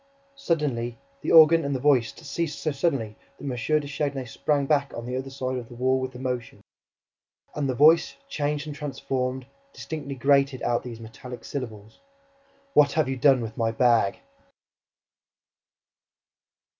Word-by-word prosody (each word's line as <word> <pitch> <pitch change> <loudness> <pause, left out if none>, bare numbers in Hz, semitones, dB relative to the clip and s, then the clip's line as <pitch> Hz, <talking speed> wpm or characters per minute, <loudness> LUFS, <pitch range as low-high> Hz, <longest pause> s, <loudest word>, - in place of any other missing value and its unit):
Suddenly, 140 - -1 0.2
the - - -2
organ 165 +1 +8
and 140 -1 -1
the - - -1
voice 130 -4 +3
ceased 160 0 -4
so 155 - -1
suddenly 135 -7 -1 0.2
that - - -14
M. 140 - -3 0.3
de 145 - -8
Chagny 140 -2 -2
sprang 140 +4 0
back, 140 -1 +1
on 115 - -6
the 125 +1 -4
other 130 +1 -4
side 130 -1 -3
of 120 -2 -7
the 120 - -11
wall, 130 +2 +1
with 130 0 -5
emotion. 125 -2 -4 0.9
And 145 -2 -2
the 130 - -1
voice, 155 +5 +5
changed 145 0 -2
and 150 -1 -6
transformed, 130 -3 -3 0.3
distinctly 145 -3 -6
grated 140 0 +2
out 120 -1 +1
these 120 -2 -8
metallic 120 +2 -10
syllables: 110 -6 -7 0.7
"WHAT 145 -1 +5
HAVE 155 -4 +1
YOU 135 - -2
DONE 135 -1 +4
WITH 110 -1 -6
MY 115 -1 +1
BAG?" 115 -4 +3
135 Hz, 155 wpm, -25 LUFS, 125-145 Hz, 0.9 s, organ